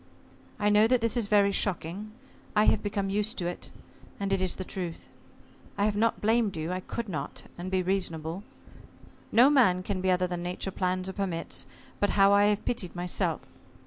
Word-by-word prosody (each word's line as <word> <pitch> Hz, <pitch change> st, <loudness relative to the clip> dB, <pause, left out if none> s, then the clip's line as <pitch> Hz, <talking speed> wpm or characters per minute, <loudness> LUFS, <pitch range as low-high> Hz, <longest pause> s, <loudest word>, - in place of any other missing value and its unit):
I 210 Hz, 0 st, +2 dB
know 210 Hz, +1 st, +5 dB
that 250 Hz, +1 st, +3 dB
this 230 Hz, 0 st, 0 dB
is 235 Hz, -4 st, +2 dB
very 200 Hz, -1 st, +4 dB
shocking. 195 Hz, +1 st, -2 dB, 0.4 s
I 210 Hz, -, +5 dB
have 215 Hz, -, +3 dB
become 200 Hz, -2 st, -2 dB
used 210 Hz, +3 st, -1 dB
to 175 Hz, -, -2 dB
it, 175 Hz, 0 st, -4 dB, 0.5 s
and, 200 Hz, -1 st, -1 dB
it 190 Hz, -, +1 dB
is 185 Hz, -1 st, 0 dB
the 185 Hz, -, -4 dB
truth. 180 Hz, -3 st, -5 dB, 0.7 s
I 200 Hz, -, +2 dB
have 210 Hz, -1 st, +1 dB
not 225 Hz, +2 st, +1 dB
blamed 220 Hz, -3 st, +2 dB
you, 160 Hz, +2 st, -3 dB
I 185 Hz, -, -2 dB
could 230 Hz, +5 st, -5 dB
not 150 Hz, -7 st, -5 dB
and 175 Hz, +2 st, -6 dB
be 185 Hz, -1 st, +1 dB
reasonable. 175 Hz, -2 st, -2 dB, 0.9 s
No 250 Hz, +5 st, +6 dB
man 185 Hz, -11 st, +4 dB
can 190 Hz, -1 st, -2 dB
be 185 Hz, -, +1 dB
other 180 Hz, 0 st, +3 dB
than 175 Hz, -1 st, -4 dB
Nature 180 Hz, +2 st, -4 dB
plans 185 Hz, 0 st, -1 dB
or 190 Hz, -, -3 dB
permits, 185 Hz, -4 st, -3 dB, 0.3 s
but 205 Hz, -, +2 dB
how 195 Hz, 0 st, +6 dB
I 205 Hz, 0 st, +5 dB
have 210 Hz, 0 st, +1 dB
pitied 200 Hz, -8 st, -2 dB
myself! 175 Hz, 0 st, 0 dB
195 Hz, 195 wpm, -28 LUFS, 180-210 Hz, 0.9 s, No